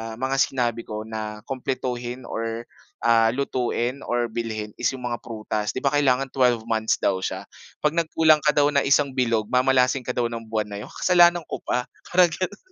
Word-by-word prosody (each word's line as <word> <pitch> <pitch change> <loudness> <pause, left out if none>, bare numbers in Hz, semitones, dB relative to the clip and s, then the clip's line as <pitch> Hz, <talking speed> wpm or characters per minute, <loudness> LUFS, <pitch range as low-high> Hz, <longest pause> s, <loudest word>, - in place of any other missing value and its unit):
mga 130 +3 -1
sinabi 120 -4 0
ko 110 0 -5
na 110 -1 -6
kumpletuhin 125 -1 -3
or 115 0 -4 0.4
ah, 115 -1 +5
lutuin 125 -1 -1
or 120 -1 0
bilhin 110 -2 -4
is 125 - +1
yung 125 - -10
mga 120 - -3
prutas. 110 -2 -3
'Di 130 - -3
ba 140 - +2
kailangan 135 -2 +2
twelve 125 -4 +2
months 110 -1 +1
daw 95 - +2
siya 95 - -4 0.4
'pag 150 - +3
nagkulang 160 -1 +4
ka 150 - +4
daw 145 0 +4
ng 140 -1 +2
isang 140 0 +4
bilog 115 -4 0
mamalasin 130 0 +3
ka 125 - -2
daw 120 -1 0
ng 115 -1 -6
buwan 110 -1 -2
na 100 - -6
yun, - - -14
kasalanan 175 -2 +5
ko - - -4
pa, 125 0 -1 0.2
parang 180 -1 +6
ganun. 185 +4 -4
125 Hz, 190 wpm, -24 LUFS, 115-135 Hz, 0.4 s, parang